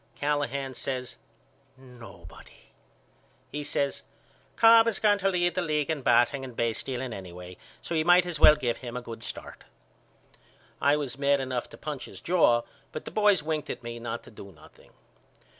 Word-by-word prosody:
Callahan 140 -1 -2
says 125 -1 -5 0.6
Nobody. 120 -9 -15 0.8
He 150 0 -4
says 140 -1 -1 0.5
Cobb 230 0 +7
is 225 -4 0
going 205 -1 +3
to 195 0 +2
lead 175 -2 +1
the 185 - -1
league 155 -2 0
in 155 -3 -3
batting 135 +2 +3
and 125 -3 -8
basestealing 120 +2 -2
anyway 90 -1 -9 0.3
so - - -5
we 160 -1 +2
might 175 +2 +5
as 175 -4 -4
well 150 - +8
give 120 -5 -2
him 120 -1 -7
a 125 - -6
good 115 -1 -8
start. - - -7 1.2
I 145 +1 +4
was 140 -3 -4
mad 140 0 +3
enough 130 -2 -3
to - - -13
punch 150 -3 -6
his - - -11
jaw 140 -10 +3 0.3
but 155 - -7
the - - -7
boys 210 -5 +3
winked 155 -2 -3
at - - -6
me 120 0 -6
not 115 0 -5
to - - -15
do 100 -2 -12
nothing. 80 -4 -19
140 Hz, 175 wpm, -27 LUFS, 120-160 Hz, 1.2 s, well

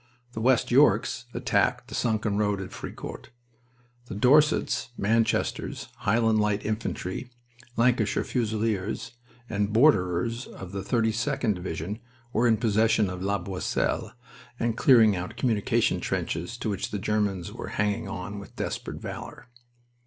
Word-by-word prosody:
The 110 - -5
West 125 +1 +3
Yorks 130 -2 +4
attacked - - +1
the - - -10
sunken 110 -3 0
road 105 -1 +1
at 95 -2 -6
Fricourt. - - -8 0.8
The 105 - -6
Dorsets, 145 +8 +3
Manchesters, 115 +2 0
Highland 110 +1 +2
Light 105 0 0
Infantry, 110 0 -3 0.5
Lancashire 115 -2 +2
Fusiliers, 110 -3 -1 0.4
and 105 -2 -1
Borderers 115 - +3
of 95 -2 -9
the 100 0 -4
32d 115 +3 0
Division 90 +3 -5 0.3
were 120 +2 +3
in 110 -2 +4
possession 110 -2 +2
of 90 0 -6
La 100 +1 +1
Boisselle 95 0 -2 0.5
and 115 -1 0
clearing 115 -5 +6
out 90 0 -5
communication 110 -6 +1
trenches 90 +9 -3
to 120 - -4
which 100 - -3
the 105 - -3
Germans 100 -3 -1
were - - -6
hanging 105 -1 0
on 100 +3 -5
with 100 - -12
desperate - - -4
valor. 125 - -8
110 Hz, 130 wpm, -27 LUFS, 100-115 Hz, 0.8 s, clearing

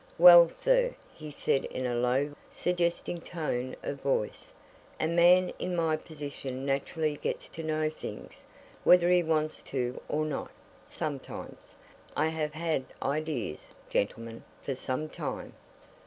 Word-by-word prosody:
"Well, 175 -1 +10
sir!" - - +2 0.2
he 155 -1 -9
said 140 -1 0
in 130 - -4
a 125 - 0
low, 125 +4 +1 0.2
suggesting 175 -1 -1
tone 130 -8 -3
of 140 -1 -4
voice. 135 -6 -1 0.5
"A 160 - +1
man 175 +2 +5
in 180 0 -2
my 165 -2 +2
position 140 -4 -6
naturally 145 +2 -1
gets - - -3
to 165 - -7
know 155 0 0
things 155 - -8 0.4
whether 180 0 +6
he 180 0 +6
wants 155 -2 0
to 125 -2 -3
or 155 +1 0
not, 150 -3 -3 0.4
sometimes. - - -6 0.4
I 160 - +3
have 155 -1 -2
had 160 -4 -1 0.2
ideas, 140 - -2 0.2
gentlemen, 115 +2 -2 0.2
for 135 - -2
some 130 +3 -3
time." - - -5
155 Hz, 135 wpm, -30 LUFS, 135-170 Hz, 0.5 s, Well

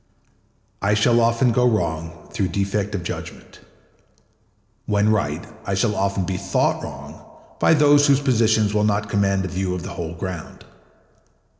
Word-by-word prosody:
I 100 +1 +2
shall 115 +3 +3
often 115 +2 +2
go 125 +2 +2
wrong 85 -5 -3
through 95 - 0
defect 100 +2 -2
of 90 - -4
judgment. - - -8 1.3
When 105 0 +2
right, 85 -7 -1 0.2
I 100 -2 -2
shall 105 +2 +1
often 100 -1 -1
be 95 0 -3
thought 100 0 0
wrong - - -9 0.4
by 160 - +4
those 145 -1 +5
whose 140 -1 +4
positions 110 -6 +2
will 105 0 +2
not 105 0 0
command 100 -2 +1
a - - -2
view 90 0 -2
of 90 - -6
the 95 - -7
whole 85 -1 -5
ground. 90 -1 -7
100 Hz, 155 wpm, -22 LUFS, 95-110 Hz, 1.3 s, those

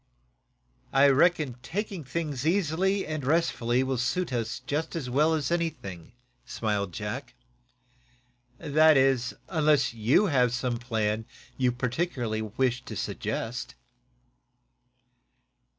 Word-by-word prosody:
"I 140 +1 +6
reckon 145 -3 +3
taking 190 - -4
things 145 -1 -3
easily 190 +3 +1
and 155 -2 -4
restfully 130 -5 +1
will 130 -2 -1
suit 170 +5 -1
us 115 -2 -2 0.4
as 140 -7 -3
well 155 +5 +3
as 150 -1 -2
anything," 115 - -3 0.3
smiled 105 -4 -2
Jack. 120 +6 -5 1.2
"That 155 +1 +4
is, 130 -2 +2
unless 150 -7 +2
you 115 - +3
have 125 - +2
some 125 -2 -2
plan 110 -2 -1 0.3
you 125 -2 +2
particularly 125 -2 -2
wish 125 +3 -1
to - - -7
suggest." 115 +1 -4
130 Hz, 105 wpm, -27 LUFS, 120-160 Hz, 1.2 s, I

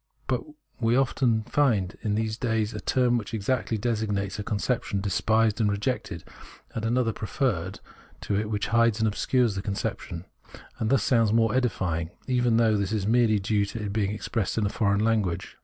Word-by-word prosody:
But - - 0 0.4
we 115 0 +2
often 125 -4 +2
find 115 -8 +1
in 105 -1 -1
these 110 0 -1
days 110 -3 -1
that - - -6
a - - -32
term 125 -2 +2
which 115 +1 -6
exactly 115 +1 -1
desig 110 0 -1
nates 100 0 -2
a - - -2
conception 105 0 -1
is 95 - -2
despised 110 +2 +2
and 105 - +3
rejected, 100 -4 -2 0.5
and 110 - -4
another 115 0 +1
preferred 100 - -2 0.4
to 100 - -2
it 105 +1 -1
which 105 -2 -2
hides 115 -2 +3
and 110 0 +2
obscures 120 +2 +1
the 95 - -3
conception, 95 -3 -4 0.5
and 110 - 0
thus 135 -5 +3
sounds 115 -4 +3
more 115 0 +3
edifying, 95 -10 0 0.2
even 125 -2 +2
though 110 -2 +3
this 100 0 -1
is 105 -3 -1
merely 115 -1 +3
due 105 +1 +1
to 110 +3 -6
its 105 -1 -3
being 100 -1 0
expressed 105 0 -2
in 110 - +2
a - - +1
foreign 100 -2 +1
language. 105 -6 0
110 Hz, 190 wpm, -26 LUFS, 100-115 Hz, 0.5 s, and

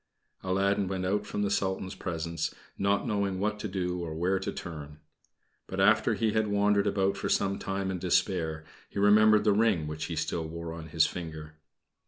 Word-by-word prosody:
Aladdin 100 +1 +1
went 95 -1 -2
out 105 +2 0
from 105 - -2
the 100 - 0
Sultan's 95 -1 -1
presence, 85 -2 -3 0.2
not 100 +1 +1
knowing 100 -3 0
what 105 +1 -1
to 105 - -3
do 90 -2 -2
or 80 -2 -5
where 90 +4 +1
to - - -3
turn. 75 -3 -8 0.7
But - - -5
after - - +4
he 110 -1 +1
had 110 -1 +2
wandered 100 0 +2
about 100 -1 +1
for - - -3
some 100 0 +1
time 95 0 -2
in 90 - -3
despair, 85 -3 0 0.2
he - - -10
remembered 105 +1 +6
the 105 -1 +4
ring 105 -7 +2
which 75 0 -4
he 85 - -4
still 80 +1 -2
wore 85 0 -6
on 80 -1 -8
his 80 0 +3
finger. 80 -3 -6
95 Hz, 190 wpm, -29 LUFS, 85-100 Hz, 0.7 s, remembered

